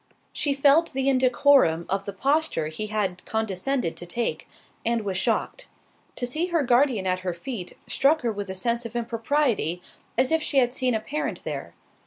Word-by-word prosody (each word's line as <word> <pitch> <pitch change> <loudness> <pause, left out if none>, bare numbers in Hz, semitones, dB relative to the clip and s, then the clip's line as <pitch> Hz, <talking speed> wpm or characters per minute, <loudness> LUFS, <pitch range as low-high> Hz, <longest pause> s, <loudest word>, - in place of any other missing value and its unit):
She 285 -2 0
felt 290 +4 +4
the 265 0 0
indecorum 255 - +4
of 195 +1 -2
the 200 - -4
posture 270 - 0
he 215 +7 -3
had 200 -4 -2
condescended 220 0 -1
to 175 - -6
take, 230 +7 -2 0.3
and 230 -2 0
was 195 -2 -2
shocked. 190 - -1 0.5
To 245 - -2
see 310 +8 -1
her 335 -4 +1
guardian 245 -4 +3
at 185 0 0
her 185 -2 -3
feet, 180 0 -6
struck 310 +3 +2
her 235 - +1
with 205 -2 -5
a 190 - -4
sense 235 +5 -1
of 230 0 -8
impropriety, 230 - 0 0.4
as 255 +3 +2
if 320 0 +3
she 290 - 0
had 245 -2 +4
seen 255 -3 +1
a - - +1
parent 295 +8 -4
there. - - -6
235 Hz, 185 wpm, -25 LUFS, 195-275 Hz, 0.5 s, felt